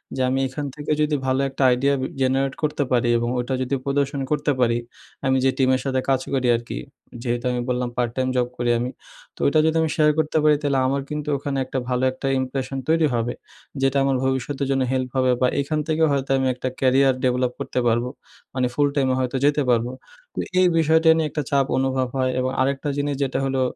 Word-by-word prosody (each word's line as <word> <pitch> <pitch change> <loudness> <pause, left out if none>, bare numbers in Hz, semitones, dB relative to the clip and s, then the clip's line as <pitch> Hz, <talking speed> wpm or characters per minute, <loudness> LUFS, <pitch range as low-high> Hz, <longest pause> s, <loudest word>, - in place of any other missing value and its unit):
যে 130 - -2
আমি 135 +1 0
এখান 145 +3 -5
থেকে 150 0 -4
যদি 150 0 +1
ভালো 130 +1 +1
একটা 135 +1 -2
idea 140 +3 +1 0.3
generate 135 +1 +1
করতে 150 -1 0
পারি 120 -1 +2
এবং 120 0 -1
ওটা 125 +2 -2
যদি 130 +2 -1
প্রদর্শন 140 0 0
করতে 150 0 +1
পারি, 115 -1 +3 0.5
আমি 130 0 +3
যে - - +5
টিমের 130 -1 +2
সাথে 130 -1 0
কাজ 130 -1 +2
করি 130 -2 +1
আর 115 - -2
কি, - - -4 0.4
যেহেতু 120 0 -2
আমি 125 0 -1
বললাম 125 0 -1
পার্ট 120 -1 0
টাইম 130 -1 0
জব 125 -1 +2
করি 120 0 -1
আমি, 120 +1 -2 0.5
তো - - -20
ওইটা 155 +2 +4
যদি 160 - +2
আমি 160 - +1
শেয়ার 150 -1 +4
করতে 155 0 0
পারি 150 -1 +5
তাহলে 140 -2 +1
আমার 140 +1 0
কিন্তু 150 0 -4
ওখানে 140 0 -3
একটা 130 - -3
ভালো 125 0 0
একটা 130 +1 -5
impression 130 +1 -3
তৈরি 160 0 +3
হবে, 120 +1 -1 0.5
যেটা 135 +1 +2
আমার 135 -1 +1
ভবিষ্যতের 130 +1 -1
জন্য 135 -1 +1
help 130 -1 -1
হবে 130 -1 +3
বা 125 - +5
এখান 150 +2 -2
থেকে 160 0 +1
হয়তো 135 -1 -1
আমি 130 - +1
একটা 125 +1 -5
career 135 +1 +4
develop 125 0 +1
করতে 125 - -2
পারবো। 120 +2 +1 0.4
মানে 125 -1 +1
full-time 140 -2 +1
এ - - +1
হয়তো 130 0 -1
যেতে 145 0 +3
পারবো। 120 0 +2 0.4
তো - - -5 0.2
এই 185 - +5
বিষয়টা 160 0 +4
নিয়ে 160 - +1
একটা 150 - -2
চাপ 140 -1 +3
অনুভব 130 -1 0
হয় 130 0 +1
এবং 130 0 0
আরেকটা 140 +2 0
জিনিস 145 0 -1
যেটা 130 - -1
হলো, 135 -1 0
135 Hz, 215 wpm, -22 LUFS, 125-145 Hz, 0.5 s, যে